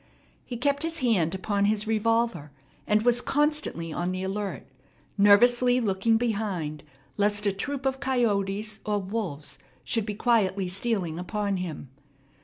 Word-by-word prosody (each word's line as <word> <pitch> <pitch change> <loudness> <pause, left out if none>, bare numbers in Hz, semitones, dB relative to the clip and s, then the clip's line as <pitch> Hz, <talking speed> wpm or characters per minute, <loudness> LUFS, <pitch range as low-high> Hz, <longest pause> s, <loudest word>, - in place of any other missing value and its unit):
He 245 - -6
kept 280 +3 0
his 330 0 -2
hand 190 -9 +2
upon 200 +1 0
his 210 +1 +1
revolver, 225 -7 0 0.4
and 210 +1 +3
was 245 0 +3
constantly 295 - -1
on 175 +1 -2
the 185 0 -3
alert, 195 +1 -4 0.5
nervously 240 +5 +5
looking 225 0 +2
behind 200 -10 -2 0.3
lest 205 0 +2
a 200 - +3
troop 275 +8 -4
of 265 0 0
coyotes 215 -5 0
or 210 -1 0
wolves 190 -7 -4 0.2
should 225 -2 -1
be 210 - -3
quietly 205 -5 +1
stealing 185 -4 -2
upon 200 +1 -2
him. 165 -7 -6
210 Hz, 140 wpm, -27 LUFS, 190-235 Hz, 0.5 s, nervously